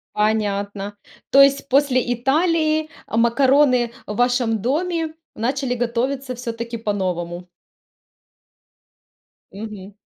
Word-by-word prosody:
Понятно. 205 -1 -1 0.3
То 275 - +8
есть, 275 0 +3
после 260 -3 +2
Италии, 310 +4 +1 0.2
а, - - -4
макароны 250 +1 +3
в 210 - -4
вашем 245 -2 +1
доме 320 - -1 0.2
начали 255 +2 -1
готовиться 250 +2 -2
все-таки 235 -1 -5
по-новому? 180 -5 -3 2.0
Мгм. 205 -1 -8
245 Hz, 90 wpm, -21 LUFS, 215-275 Hz, 2.0 s, То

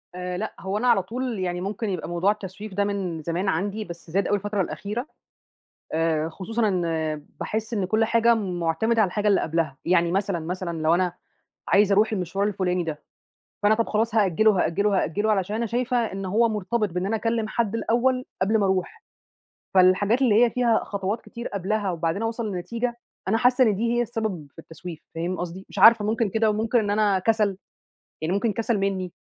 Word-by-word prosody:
آآ 180 0 -4
لأ، 215 +4 -4
هو 190 +1 -3
أنا 245 +4 0
على 230 -6 +4
طول 240 +1 -4
يعني 180 -1 -2
ممكن 205 +3 -3
يبقى 180 -3 -4
موضوع 175 +3 +2
التسويف 205 0 -7
ده 200 +2 +1
من 195 -5 -3
زمان 175 +5 -1
عندي، 205 +5 -2
بس 170 -2 -10
زاد 195 +2 +1
أوي 205 - +2
الفترة 205 0 -2
الأخيرة، 210 +7 -4 0.9
آآ 160 -1 +1
خصوصًا 220 +6 -2
إن 165 -5 -1 0.2
باحِس 220 +2 -3
إن 200 -4 0
كل 220 +4 +2
حاجة 230 +1 +4
مُعتمدة 195 +3 0
على 205 - +4
الحاجة 210 +3 -1
اللي 200 -2 +4
قبلها. 160 -4 -1
يعني 170 -1 +3
مثلًا، 195 -1 0
مثلًا 170 +1 -4
لو 160 +2 +4
أنا 180 -1 0 0.5
عايزة 205 0 +4
أروح 215 +3 +3
المشوار 195 0 -1
الفلُاني 185 -3 -1
ده، 155 -3 -4 0.6
فأنا 210 +1 +5
طَب 230 0 -1
خلاص 220 +1 0
هأجِّله 215 +1 +4
وهأجِّله 200 +1 +1
وهأجِّله 205 +2 +1
علشان 205 +1 0
أنا 230 +1 -1
شايفة 245 +3 0
إن 195 -5 -2
هو 225 +5 +2
مرتبط 215 +1 -1
بإن 180 +2 -2
أنا 215 +3 0
أكلِّم 225 0 -1
حد 225 -1 -1
الأول 250 +3 +1 0.2
قبل 210 +4 +3
ما 200 - +2
أروح، 190 -1 -1 0.7
فالحاجات 195 +6 +4
اللي 235 -2 +5
هي 240 - +2
فيها 235 -2 +2
خطوات 200 +2 -3
كتير 235 0 -7
قبلها 200 +1 -1
وبعدين 170 +3 -2
أوصَل 225 0 -2
لنتيجة، 230 +7 -3 0.3
أنا 220 +3 +2
حاسّة 250 +2 +4
إن 215 -3 +3
دي 230 +3 0
هي 240 - +3
السبب 220 -9 -3
في - - -37
التسويف، 165 0 -9
فاهم 170 +3 -3
قصدي؟ 180 +2 -6
مش - - -8
عارفة 225 +2 +7
ممكن 220 +1 +1
كده 220 +2 +2
وممكن 220 +3 +1
إن 210 -3 0
أنا 205 -2 +2
كَسَل، 210 -1 +1 0.6
يعني 165 +4 -1
ممكن 210 +2 +1
كَسَل 230 +1 0
منّي، 190 -2 -2
200 Hz, 195 wpm, -24 LUFS, 180-225 Hz, 0.9 s, عارفة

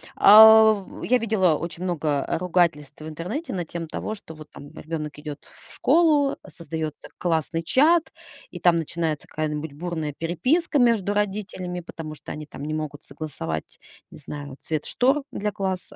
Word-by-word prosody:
А. 220 0 +8 0.2
Я 250 0 +3
видела 200 -7 +2
очень 170 +1 -6
много 155 -6 -1
ругательств 170 -5 0
в 155 - -7
интернете 180 - -5
на 180 -3 -3
тему 165 0 -6
того, 215 +7 -4
что 200 -6 -12
вот 155 -1 -13
там 145 +1 -12
ребёнок 155 -1 -6
идет 150 -1 -8
в - - -18
школу, 300 -5 +3
создаётся 160 -2 -6
классный 165 -1 0
чат, 310 - +3 0.4
и - - -9
там 175 -1 +4
начинается 165 -1 -3
какая-нибудь 150 -1 -4
бурная 160 -1 -4
переписка 260 - +1
между 225 -5 +3
родителями, 195 -3 -3
потому 160 -2 -8
что - - -10
они 150 0 -6
там 140 - -9
не 155 - -3
могут 155 -1 -5
согласовать, 135 - -6 0.3
не - - -13
знаю, 145 -2 -8
цвет 155 -2 -3
штор 270 +4 +1
для 210 +1 -2
класса. 190 -2 -4
170 Hz, 160 wpm, -24 LUFS, 155-210 Hz, 0.4 s, А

